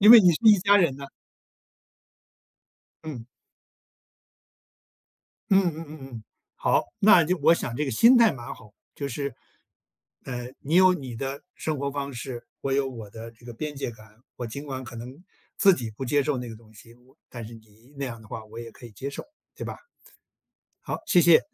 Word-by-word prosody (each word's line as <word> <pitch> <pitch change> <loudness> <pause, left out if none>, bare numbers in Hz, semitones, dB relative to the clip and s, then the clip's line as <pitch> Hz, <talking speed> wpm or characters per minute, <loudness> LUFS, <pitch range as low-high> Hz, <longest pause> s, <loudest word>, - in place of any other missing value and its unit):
因 210 +3 +9
为 235 - +12
你 180 -3 +6
是 155 - 0
一 215 -2 +8
家 200 +2 +5
人 165 -9 +3
呐。 140 - -7 2.0
嗯。 135 -8 -7 2.2
嗯 195 0 +6
嗯 165 -2 -2
嗯 155 +1 -9 0.2
嗯。 110 - -8 0.3
好， - - +2 0.2
那 195 -5 +7
就 180 +3 0
我 155 +3 +6
想 120 -7 -3
这 150 +4 -1
个 135 - -2
心 235 - +6
态 230 -3 +6
蛮 120 -3 -7
好， 105 -2 -16 0.2
就 140 - -3
是 140 0 -4 0.9
呃， 125 -1 -5
你 155 +4 -1
有 185 0 +7
你 130 -8 -6
的 135 +4 -4
生 155 -2 -3
活 140 0 -2
方 140 0 -4
式， 120 0 -6 0.2
我 135 - -2
有 135 -1 +1
我 115 -5 -9
的 115 +2 -9
这 120 +1 -21
个 120 - -8
边 150 +5 -5
界 135 -3 -3
感， 110 -1 -17 0.2
我 120 - -4
尽 140 +6 -7
管 130 -2 -5
可 120 -1 -10
能 130 +9 -9 0.3
自 195 -1 +6
己 115 -7 -4
不 120 +5 -7
接 145 +2 +2
受 145 -2 0
那 125 -1 -5
个 110 - -8
东 110 -1 -19
西， 115 +2 -16 0.3
但 120 -3 -7
是 115 - -10
你 110 +4 -18
那 140 - -2
样 115 -3 -7
的 110 - -15
话 110 - -6
我 110 +2 -10
也 115 -1 -8
可 120 - -14
以 115 - -11
接 135 +7 -6
受， - - -7 0.3
对 - - -6
吧？ - - -6 1.1
好， - - -4
谢 175 - +5
谢。 170 -2 +7
135 Hz, 210 characters per minute, -26 LUFS, 115-155 Hz, 2.2 s, 为